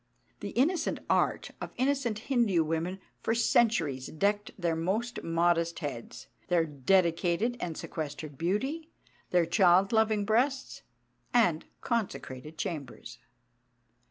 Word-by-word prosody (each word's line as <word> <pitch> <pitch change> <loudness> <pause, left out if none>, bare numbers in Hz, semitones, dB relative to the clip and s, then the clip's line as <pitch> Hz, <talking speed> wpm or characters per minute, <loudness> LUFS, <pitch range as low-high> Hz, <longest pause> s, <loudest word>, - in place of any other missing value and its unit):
The - - -5
innocent 330 +8 +2
art - - +1
of - - -6
innocent 260 -4 +1
Hindu 220 -8 +2
women 165 +4 -2 0.2
for 225 - 0
centuries 215 - +2
decked 205 +5 0
their 170 -2 0
most 205 +9 -2
modest 170 0 +1
heads, 140 -7 -6 0.2
their 170 -2 +3
dedicated 170 - +1
and 170 -3 -4
sequestered 155 -1 -5
beauty, 265 - -2 0.4
their 175 -2 +3
child 185 +2 +4
loving 220 -2 +2
breasts, 260 +6 0 0.5
and 175 -9 +3 0.2
consecrated 160 - -3
chambers. 150 - -6
180 Hz, 110 wpm, -30 LUFS, 165-230 Hz, 0.5 s, child